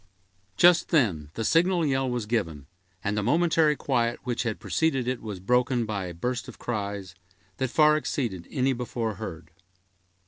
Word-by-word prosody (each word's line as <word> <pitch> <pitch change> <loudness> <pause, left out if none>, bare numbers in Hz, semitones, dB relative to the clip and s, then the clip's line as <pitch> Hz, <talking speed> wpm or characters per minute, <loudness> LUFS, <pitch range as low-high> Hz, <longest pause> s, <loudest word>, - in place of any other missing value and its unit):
Just 175 0 +5
then 95 - +1
the 115 - -2
signal 170 - +3
yell 135 -2 +1
was 120 -3 -2
given, 85 - -2 0.4
and 100 +1 -1
the 105 - 0
momentary 160 +4 +3
quiet 120 -4 0
which 120 -2 -2
had 115 -3 -2
preceded 135 -6 0
it 130 -1 -2
was 105 -4 -6
broken 125 +4 +1
by 105 -3 -3
a 90 - -6
burst 125 +7 -3
of - - -10
cries, 100 -5 -4 0.4
that 130 -2 -1
far 150 +3 +5
exceeded 115 - -3
any 135 0 +1
before 120 -2 -3
heard. 85 -7 -7
120 Hz, 165 wpm, -26 LUFS, 100-135 Hz, 0.4 s, Just